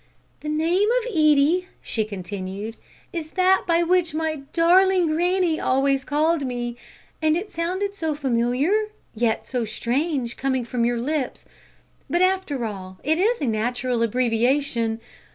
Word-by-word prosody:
"The 300 - -5
name 335 +7 +2
of - - -5
Edie," 310 +1 +3
she 220 -2 -2
continued, 200 +2 -6 0.4
"is 325 -3 -4
that 375 +1 +4
by 340 0 +3
which 350 -2 +1
my 315 -1 -1
darling 365 +2 +4
granny 350 0 +1
always 270 +1 +1
called 305 +2 +1
me, 240 -2 -3 0.5
and 310 0 +3
it 400 +4 -5
sounded 370 +4 -2
so 320 -6 -2
familiar 255 +2 +1 0.4
yet 225 0 0
so 250 -2 -2
strange 245 +4 -2
coming 260 -2 -1
from 235 0 -1
your 240 0 +1
lips. 270 +2 -2 0.6
But, 345 +2 +2
after 370 -10 0
all, 190 -3 -7
it 315 +4 +1
is 460 +5 +2
a - - +1
natural 245 +2 -1
abbreviation. 235 0 +1
285 Hz, 140 wpm, -23 LUFS, 240-340 Hz, 0.6 s, that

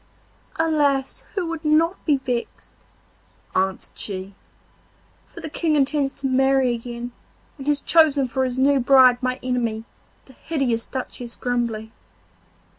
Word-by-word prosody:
'Alas! 290 -4 +1
who 380 -3 -1
would 330 -1 -5
not 320 +4 +2
be 295 -3 +4
vexed?' 250 -3 -5 0.8
answered 190 0 -1
she, 195 -1 -5 0.9
'for - - -12
the - - -5
King 315 0 0
intends 280 -1 +1
to 275 - -9
marry 265 -1 +3
again, 240 +1 -6 0.5
and 270 - -8
has 290 -1 +2
chosen 300 -5 +4
for 260 +2 -1
his 255 -1 -2
new 275 +1 +4
bride 255 -1 +6
my 255 0 -1
enemy, 235 -3 -1 0.4
the 265 - -17
hideous 260 -6 -2
Duchess 250 -2 -6
Grumbly. 235 -3 -2
265 Hz, 130 wpm, -23 LUFS, 240-290 Hz, 0.9 s, bride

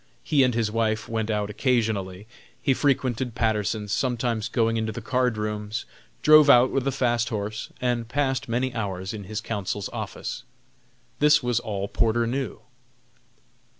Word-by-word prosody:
He 145 -3 +3
and 125 -3 +3
his 115 -2 0
wife 110 0 0
went 110 -1 -2
out 105 -1 -1
occasionally. 105 -6 0 0.3
He 135 - +2
frequented 130 -3 0
Patterson's, 105 -2 0
sometimes 120 -3 -1
going 115 -2 +1
into 110 0 -1
the 110 - -6
card 125 0 0
rooms, 105 +1 -3 0.4
drove 155 -1 +7
out 125 -1 +7
with 135 0 0
a - - +2
fast 120 -3 +1
horse, 105 -1 -4
and 120 -2 -1
passed 135 -1 -1
many 125 +2 0
hours 95 -3 -3
in 105 -2 -7
his 110 +2 -4
counsel's 105 -3 -3
office. - - -5 0.8
This 150 -1 +5
was 120 -2 +1
all 100 -3 -3
Porter 115 +3 +1
knew. 130 +3 -3
115 Hz, 150 wpm, -25 LUFS, 105-125 Hz, 0.8 s, drove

